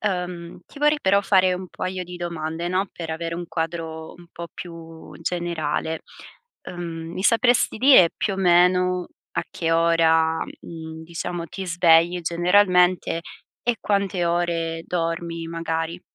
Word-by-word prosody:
Uhm, 180 Hz, -4 st, -3 dB
ti 285 Hz, -, -14 dB
vorrei 295 Hz, 0 st, +3 dB
però 200 Hz, -2 st, +3 dB
fare 185 Hz, -2 st, +4 dB
un 185 Hz, +1 st, -6 dB
paio 185 Hz, 0 st, -4 dB
di 180 Hz, +1 st, -9 dB
domande, 170 Hz, -1 st, -4 dB
no, 185 Hz, +1 st, 0 dB
per 165 Hz, -2 st, -6 dB
avere 165 Hz, +1 st, -3 dB
un 175 Hz, 0 st, -5 dB
quadro 160 Hz, -1 st, -4 dB
un 175 Hz, -1 st, -16 dB
po' 170 Hz, 0 st, -7 dB
più 165 Hz, -2 st, -10 dB
generale. 160 Hz, -2 st, -2 dB, 0.6 s
Ehm, 165 Hz, -2 st, -6 dB
mi 185 Hz, -, -4 dB
sapresti 240 Hz, +3 st, +3 dB
dire 255 Hz, -10 st, +7 dB
più 200 Hz, -, -1 dB
o -, -, -7 dB
meno, 180 Hz, 0 st, +3 dB, 0.2 s
a -, -, -1 dB
che 165 Hz, -1 st, -1 dB
ora, 165 Hz, -1 st, +3 dB, 0.2 s
mhmm, 160 Hz, -1 st, -9 dB
diciamo, 170 Hz, +1 st, -5 dB
ti 190 Hz, +3 st, -7 dB
svegli 170 Hz, 0 st, +4 dB
generalmente 180 Hz, 0 st, +3 dB, 0.4 s
e 240 Hz, -1 st, +1 dB
quante 200 Hz, -3 st, 0 dB
ore 170 Hz, -1 st, -1 dB
dormi, 165 Hz, -1 st, -3 dB
magari? 165 Hz, +1 st, -3 dB
170 Hz, 140 wpm, -23 LUFS, 165-180 Hz, 0.6 s, dire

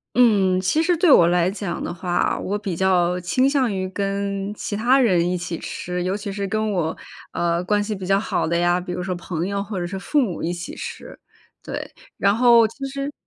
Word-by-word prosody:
嗯， 200 Hz, -7 st, +4 dB
其 300 Hz, -, +1 dB
实 345 Hz, +1 st, +2 dB
对 330 Hz, -2 st, +5 dB
我 170 Hz, -, +7 dB
来 175 Hz, 0 st, +2 dB
讲 195 Hz, -3 st, -4 dB
的 -, -, -3 dB
话， 175 Hz, 0 st, 0 dB
我 205 Hz, +2 st, -2 dB
比 200 Hz, -4 st, -4 dB
较 180 Hz, 0 st, +2 dB
倾 255 Hz, +10 st, +2 dB
向 270 Hz, -5 st, +1 dB
于 190 Hz, -1 st, -2 dB
跟 200 Hz, 0 st, -2 dB
其 210 Hz, -, -5 dB
他 240 Hz, +6 st, +3 dB
人 180 Hz, -9 st, +3 dB
一 180 Hz, -, 0 dB
起 175 Hz, -1 st, -4 dB
吃， 180 Hz, 0 st, -4 dB
尤 185 Hz, +2 st, -1 dB
其 200 Hz, -1 st, -5 dB
是 200 Hz, 0 st, -3 dB
跟 215 Hz, +1 st, -1 dB
我， 165 Hz, -4 st, -1 dB, 0.4 s
呃， 170 Hz, 0 st, 0 dB
关 205 Hz, +3 st, +1 dB
系 215 Hz, 0 st, -3 dB
比 190 Hz, -2 st, -6 dB
较 195 Hz, +1 st, +3 dB
好 215 Hz, -, -1 dB
的 170 Hz, +1 st, 0 dB
呀， 175 Hz, +1 st, +2 dB
比 180 Hz, 0 st, -6 dB
如 180 Hz, -, -3 dB
说 185 Hz, 0 st, -2 dB
朋 175 Hz, -1 st, -4 dB
友 200 Hz, 0 st, -2 dB
或 200 Hz, -1 st, -5 dB
者 175 Hz, -, -2 dB
是 190 Hz, +2 st, -5 dB
父 295 Hz, +9 st, +1 dB
母 205 Hz, -10 st, -2 dB
一 165 Hz, -, -1 dB
起 175 Hz, 0 st, -6 dB
吃， -, -, -8 dB, 0.5 s
对。 -, -, -6 dB, 0.2 s
然 200 Hz, 0 st, +3 dB
后 235 Hz, -1 st, +6 dB
其 250 Hz, +5 st, -7 dB
实 275 Hz, +1 st, -4 dB
195 Hz, 240 characters per minute, -22 LUFS, 180-215 Hz, 0.5 s, 我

